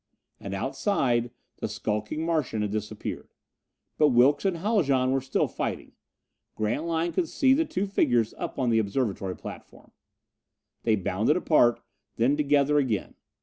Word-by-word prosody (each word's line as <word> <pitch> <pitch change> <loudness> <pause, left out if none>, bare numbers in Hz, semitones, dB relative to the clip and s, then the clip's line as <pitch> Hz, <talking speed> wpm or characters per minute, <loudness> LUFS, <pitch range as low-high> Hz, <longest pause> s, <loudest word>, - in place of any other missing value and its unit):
And - - -5
outside, 120 - 0 0.3
the - - -3
skulking 105 +9 -3
Martian 150 -10 0
had 105 - -2
disappeared. 105 0 -5 0.6
But 150 - +6
Wilks 130 +7 +4
and 190 -3 +1
Haljan 150 - +1
were 135 0 +1
still 135 +1 0
fighting. - - -4 0.6
Grantline 160 +10 -1
could 340 -4 0
see 265 -1 +3
the 320 +4 +2
two 190 -7 -2
figures 120 - +1
up - - -5
on 125 -3 +1
the 115 - +4
observatory 100 -4 -2
platform. - - -11 0.9
They 110 - +2
bounded 105 - +1
apart, 125 -9 +3 0.3
then 125 +5 +2
together 145 0 +3
again. 115 -8 -1
135 Hz, 140 wpm, -27 LUFS, 110-160 Hz, 0.9 s, But